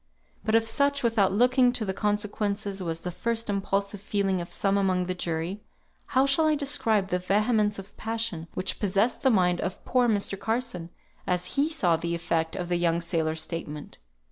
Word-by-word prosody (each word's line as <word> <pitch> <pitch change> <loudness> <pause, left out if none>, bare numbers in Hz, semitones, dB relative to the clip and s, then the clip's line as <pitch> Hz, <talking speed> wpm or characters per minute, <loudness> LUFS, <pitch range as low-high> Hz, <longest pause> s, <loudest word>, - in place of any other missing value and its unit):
But 220 - +1
if 225 0 +4
such, 280 +4 +2
without 220 -5 +3
looking 250 +4 +4
to 230 -3 0
the 190 - -2
consequences, 205 -1 -1
was 165 -2 -3
the 180 - -4
first 230 +3 -2
impulsive 200 0 -1
feeling 200 -3 0
of 170 - -8
some 195 -1 +1
among 185 -2 +1
the 185 - -2
jury, 175 +3 -3 0.6
how 265 - +6
shall 275 +3 +3
I 310 - +3
describe 225 -9 +1
the 180 - 0
vehemence 210 +2 +2
of 195 +1 -10
passion 225 -7 -3
which 185 - -2
possessed 205 +4 +1
the 265 - +4
mind 180 -6 +3
of 185 - -4
poor 250 -1 +3
Mr. 200 -3 0
Carson, 220 -7 -2 0.4
as 180 0 -1
he 285 +3 +2
saw 180 - +2
the 170 +1 -2
effect 165 -1 -1
of 180 -2 -3
the 175 0 +1
young 170 -1 +2
sailor's 160 -2 -1
statement? 150 -3 -6
200 Hz, 185 wpm, -27 LUFS, 180-225 Hz, 0.6 s, how